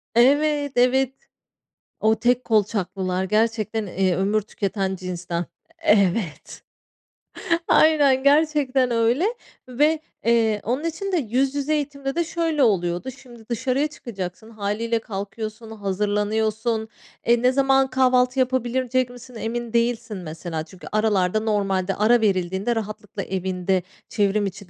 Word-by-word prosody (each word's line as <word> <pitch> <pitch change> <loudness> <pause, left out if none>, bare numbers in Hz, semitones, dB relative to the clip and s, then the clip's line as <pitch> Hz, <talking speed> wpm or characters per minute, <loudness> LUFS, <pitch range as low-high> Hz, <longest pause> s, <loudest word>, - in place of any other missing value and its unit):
Evet, 290 +3 +3
evet. 255 +1 +3 0.9
O 220 +1 +3
tek 245 +2 +2
kolçaklılar 190 -4 0
gerçekten, 220 +1 0
eee, 185 0 +1
ömür 200 +4 +1
tüketen 195 -2 -2
cinsten. 175 -2 -4 0.3
Evet. 200 - +1 1.1
Aynen, 285 -4 +4
gerçekten 280 -3 +3
öyle 235 +8 +2 0.4
ve, 300 +5 +2 0.3
eee, 225 -3 +2
onun 255 +6 -1
için 335 +4 -3
de 365 - +2
yüz 265 0 0
yüze 285 +2 0
eğitimde 280 -2 -3
de 340 - +2
şöyle 330 -3 0
oluyordu. 180 +1 +1
Şimdi 240 -4 -15
dışarıya 260 +5 0
çıkacaksın, 220 -8 -7
hâliyle 225 +2 -2
kalkıyorsun, 215 +2 -6
hazırlanıyorsun. 215 +2 -1 0.4
Eee, 235 0 +4
ne 250 +1 +4
zaman 270 0 +3
kahvaltı 255 0 +2
yapabilecek 255 0 0
misin, 245 0 -13
emin 230 +1 -4
değilsin 235 -2 0
mesela. 160 -1 -5
Çünkü 185 +1 -13
aralarda 210 -2 +2
normalde 195 -3 0
ara 225 +4 +4
verildiğinde 190 +2 0
rahatlıkla 210 -2 -5
evinde, 185 0 -1 0.3
çevrim 205 -1 +1
içi 195 0 -7
225 Hz, 120 wpm, -23 LUFS, 200-260 Hz, 1.1 s, Aynen